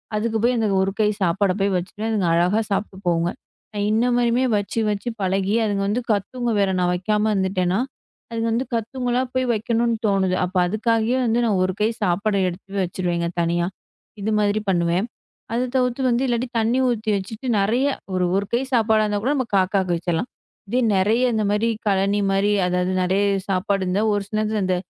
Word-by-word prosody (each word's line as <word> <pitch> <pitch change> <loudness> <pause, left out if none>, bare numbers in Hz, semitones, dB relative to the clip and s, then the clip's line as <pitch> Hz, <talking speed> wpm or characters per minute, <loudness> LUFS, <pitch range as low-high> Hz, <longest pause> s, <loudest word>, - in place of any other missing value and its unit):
அதுக்கு 220 +1 0
போயி 250 +1 +3
அந்த 220 -1 +1
ஒரு 195 - +1
கை 210 - +4
சாப்பாட 190 +2 +2
போயி 195 0 +1
வச்சிருவேன். 205 +5 -3
அதுங்க 200 -5 +1
அழகா 180 +6 +2
சாப்பிட்டு 195 -1 -2
போகுங்க. 170 0 +1 0.4
நான் 205 0 -1
இன்ன 225 +3 +2
மாரியுமே 240 +2 +2
வச்சு 205 +3 -2
வச்சு 210 +4 -2
பழகி 195 +2 0
அதுங்க 200 -1 -1
வந்து 230 +5 0
கத்துங்க. 235 +3 -1
வேற 195 - +2
நான் 180 0 +2
வெக்காம 210 +4 0
இருந்துட்டேன்னா, 190 0 0 0.5
அதுங்க 230 0 -1
வந்து 255 +3 0
கத்துங்களா! 245 +2 -1
போய் 255 0 +1
வெக்கணுன்னு 230 +1 0
தோணுது. 190 -2 +1
அப்ப 185 +1 -9
அதுக்காகே 225 +4 +1
வந்து 230 +1 +2
நான் 200 -4 +1
ஒரு 185 - -2
கை 215 - +3
சாப்பாட 200 +3 +1
எடுத்து 195 +3 -6
வச்சிருவேங்க 175 -1 -2
தனியா. 170 +1 0 0.5
இது 215 +2 -1
மாதிரி 210 +1 +1
பண்ணுவேன். 175 +4 +1 0.5
அதத் 245 +2 -1
தவுத்து 250 0 +1
வந்து 240 +2 +1
இல்லாட்டி 240 +1 0
தண்ணீ 235 +4 +1
ஊத்தி 220 -2 -2
வச்சிட்டு 215 +6 -7
நிறைய 230 +7 +1 0.3
ஒரு 185 -1 +1
ஒரு 200 - -1
கை 235 - +3
சாப்பாடா 220 -2 +3
இருந்தாக்கூட 210 +7 0
நம்ம 260 -4 -1
காக்கா 190 +1 +2 0.2
வெச்சரலாம். 175 +6 -2 0.4
இதே 245 +5 0 0.2
நிறைய 225 +6 +2
இந்தமாரி 210 +1 +1 0.2
கலனிமாரி. 195 +1 +2
அதாவது 180 0 0
நிறைய 195 +3 +2 0.2
சாப்பாடு 195 +1 0
இருந்தா, 185 +3 0
ஒரு 205 - 0
சில 215 - -6
நேரத்துல 215 -1 0
அந்த 185 - +1
205 Hz, 175 wpm, -22 LUFS, 190-230 Hz, 0.5 s, கை